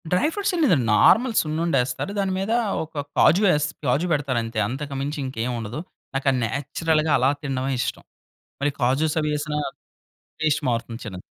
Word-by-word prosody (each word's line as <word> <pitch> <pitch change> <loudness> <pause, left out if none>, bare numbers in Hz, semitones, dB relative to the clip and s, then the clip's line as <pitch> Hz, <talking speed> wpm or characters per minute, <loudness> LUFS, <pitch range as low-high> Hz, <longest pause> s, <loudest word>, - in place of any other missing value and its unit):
Dry 180 +11 +3
fruits 405 -1 -1
లేదండి 160 - +3
normal 240 - +5
సున్నుండేస్తారు 155 -1 0
దాని 195 -1 0
మీద 195 +3 -2 0.3
ఒక 155 -2 -5 0.2
కాజు 180 +7 +5
యెస్ 150 -3 +2 0.2
కాజు 135 +7 +2
పెడతారు 140 -5 +1
అంతే 115 -1 -4
అంతకు 140 +4 -5
మించి 145 +2 -3
ఇంకేముండదు. 120 -1 -3 0.3
నాకు 135 +1 -2
అది 130 - 0
నేచురల్‌గా 155 +5 0
అలా 130 +1 +3
తినడమే 135 -2 -2
ఇష్టం. - - -3 0.6
మరి 145 +1 +2
కాజుస్ 140 +6 +1
అవి 150 0 -1
యేసిన 150 0 -3 0.9
టేస్ట్ 155 -1 +1
మారుతుంది 115 -1 -3
చిన్దిది. 95 -4 -7
145 Hz, 155 wpm, -23 LUFS, 125-160 Hz, 0.9 s, normal